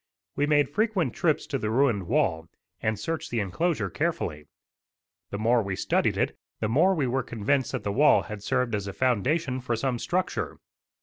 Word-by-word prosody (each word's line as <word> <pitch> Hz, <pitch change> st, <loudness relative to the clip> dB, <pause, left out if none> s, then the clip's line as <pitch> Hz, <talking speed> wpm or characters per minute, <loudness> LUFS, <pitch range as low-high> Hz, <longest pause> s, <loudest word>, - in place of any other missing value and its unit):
We 145 Hz, -, +1 dB
made 145 Hz, -2 st, +3 dB
frequent 210 Hz, -, +1 dB
trips 170 Hz, -4 st, +1 dB
to 135 Hz, -, -2 dB
the 110 Hz, -, -2 dB
ruined 115 Hz, -6 st, +2 dB
wall, 85 Hz, -, +1 dB, 0.3 s
and 110 Hz, 0 st, 0 dB
searched 160 Hz, +8 st, -3 dB
the 120 Hz, -, -1 dB
enclosure 155 Hz, -, -1 dB
carefully. 150 Hz, -, -2 dB, 0.8 s
The 100 Hz, -, -4 dB
more 115 Hz, +3 st, +3 dB
we 100 Hz, -2 st, -3 dB
studied -, -, +1 dB
it -, -, 0 dB, 0.2 s
the 110 Hz, -, 0 dB
more 165 Hz, -, +4 dB
we 150 Hz, -5 st, +1 dB
were 130 Hz, +2 st, 0 dB
convinced 120 Hz, +3 st, 0 dB
that -, -, -3 dB
the 100 Hz, -, -1 dB
wall 145 Hz, +8 st, +5 dB
had 105 Hz, -1 st, -7 dB
served 120 Hz, +2 st, 0 dB
as 100 Hz, -1 st, -2 dB
a 100 Hz, -, -5 dB
foundation 130 Hz, -, +1 dB
for 120 Hz, -1 st, -1 dB
some 125 Hz, +1 st, -1 dB
structure. 185 Hz, +7 st, -2 dB
125 Hz, 185 wpm, -27 LUFS, 105-150 Hz, 0.8 s, wall